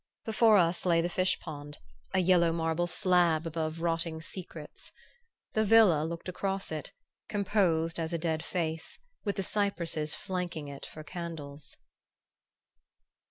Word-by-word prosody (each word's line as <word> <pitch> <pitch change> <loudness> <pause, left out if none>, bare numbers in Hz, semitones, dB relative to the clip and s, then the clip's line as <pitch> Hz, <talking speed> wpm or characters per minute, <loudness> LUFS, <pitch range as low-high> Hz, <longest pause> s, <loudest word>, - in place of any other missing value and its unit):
Before 220 -1 +5
us 170 -1 +2
lay 170 -2 +4
the 170 +1 +1
fish 185 +2 +2
pond, 145 -2 -8 0.3
a - - 0
yellow 175 -2 +4
marble 165 +1 0
slab 175 -3 +3
above 160 0 -3
rotting 165 -1 -1
secrets. 160 -2 -9 0.6
The 220 - +3
villa 210 -8 +6
looked 170 +2 -5
across 195 +1 -2
it, 155 -1 -4 0.4
composed 185 -6 +1
as 165 0 -2
a 170 - 0
dead 160 -1 -1
face, 165 -2 -3 0.3
with 200 -2 -1
the 195 - -1
cypresses 170 -7 0
flanking 175 -5 -4
it 140 -1 -8
for 155 - -10
candles.... 155 -4 -6
170 Hz, 135 wpm, -30 LUFS, 160-185 Hz, 0.6 s, villa